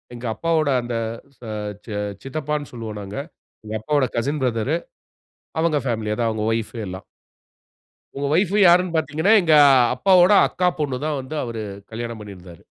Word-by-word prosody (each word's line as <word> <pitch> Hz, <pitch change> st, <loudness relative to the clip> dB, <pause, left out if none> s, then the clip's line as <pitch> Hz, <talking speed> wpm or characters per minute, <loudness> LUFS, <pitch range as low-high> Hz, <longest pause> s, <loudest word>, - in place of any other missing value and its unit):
எங்க 120 Hz, -, -8 dB
அப்பாவோட 160 Hz, -1 st, +1 dB
அந்த 120 Hz, -1 st, -4 dB, 0.4 s
ச -, -, -54 dB, 0.4 s
ச -, -, -27 dB
சி -, -, -7 dB, 0.3 s
சித்தப்பான்னு 150 Hz, +1 st, -3 dB
சொல்வோ 115 Hz, -2 st, -6 dB
நாங்க. 100 Hz, +5 st, -7 dB, 0.5 s
எங்க 110 Hz, -, -5 dB
அப்பாவோட 140 Hz, +2 st, +1 dB
கசின் 140 Hz, +4 st, -1 dB
ப்ரதரு 125 Hz, +6 st, 0 dB, 0.8 s
அவங்க 160 Hz, -2 st, +2 dB
பேமிலி 110 Hz, -2 st, -1 dB
அதா 115 Hz, 0 st, 0 dB
அவங்க 110 Hz, -1 st, -2 dB
வைப் 115 Hz, 0 st, -2 dB
எல்லா. 95 Hz, +1 st, -7 dB, 1.1 s
அவுங்க 140 Hz, +1 st, -3 dB
வைப் 190 Hz, +3 st, +2 dB
யார்ன்னு 175 Hz, 0 st, +5 dB
பார்த்தீங்கன்னா, 160 Hz, +7 st, +2 dB
எங்க 160 Hz, -3 st, +3 dB, 0.4 s
அப்பாவோட 190 Hz, 0 st, +5 dB, 0.2 s
அக்கா 180 Hz, 0 st, 0 dB
பொண்ணு 135 Hz, -4 st, -1 dB
தான் 150 Hz, -2 st, -1 dB
வந்து 130 Hz, +4 st, -7 dB
அவரு 115 Hz, -3 st, -5 dB, 0.3 s
கல்யாணம் 115 Hz, 0 st, -5 dB
பண்ணியிருந்தாரு. 90 Hz, -4 st, -12 dB
135 Hz, 150 wpm, -22 LUFS, 115-160 Hz, 1.1 s, யார்ன்னு